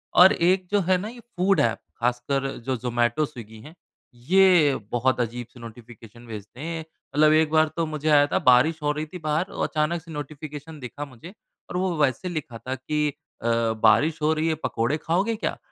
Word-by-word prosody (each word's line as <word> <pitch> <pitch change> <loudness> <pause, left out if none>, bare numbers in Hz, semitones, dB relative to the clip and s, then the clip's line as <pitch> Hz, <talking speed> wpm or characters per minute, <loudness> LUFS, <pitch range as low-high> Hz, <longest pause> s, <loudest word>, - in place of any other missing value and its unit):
और 185 +2 +8
एक 185 +2 +2
जो 205 - +3
है 185 - +5
ना 200 +4 -5
ये 240 - -11
फूड 195 -5 0
ऐप 115 -1 +2 0.2
ख़ासकर 125 +3 0 0.2
जो 130 -1 0
ज़ोमैटो, 120 +4 0
स्विगी 110 -6 -11
है 155 +6 -13 0.5
ये 180 -7 +5 0.2
बहुत 125 +1 +1
अजीब 120 0 -4
से 125 - -14
नोटिफ़िकेशन 115 0 -13
भेजते 110 +3 -9
हैं 165 +1 -4 0.4
मतलब 155 +1 +5
एक 155 -1 +3
बार 155 0 +4
तो 165 - +1
मुझे 155 0 -3
आया 145 -1 +5
था - - 0
बारिश 130 +6 +5
हो 150 - +2
रही 150 +1 -3
थी - - -4
बाहर 155 +4 0
और - - -1
अचानक 155 +2 -1
से 165 0 -13
नोटिफ़िकेशन 150 +1 -8
दिखा 140 +3 -6
मुझे 145 - -13 0.4
और 180 - -3
वो 185 -2 0
वैसे 150 +5 0
लिखा 150 -9 -5
था 130 +3 -5
कि 150 +3 -1 0.3
अ, 115 - -3 0.4
बारिश 150 +8 +4
हो 155 +1 +3
रही 160 +1 -1
है 160 - +1
पकोड़े 115 +7 0
खाओगे 185 +9 0
क्या? - - -3
150 Hz, 200 wpm, -24 LUFS, 125-165 Hz, 0.5 s, और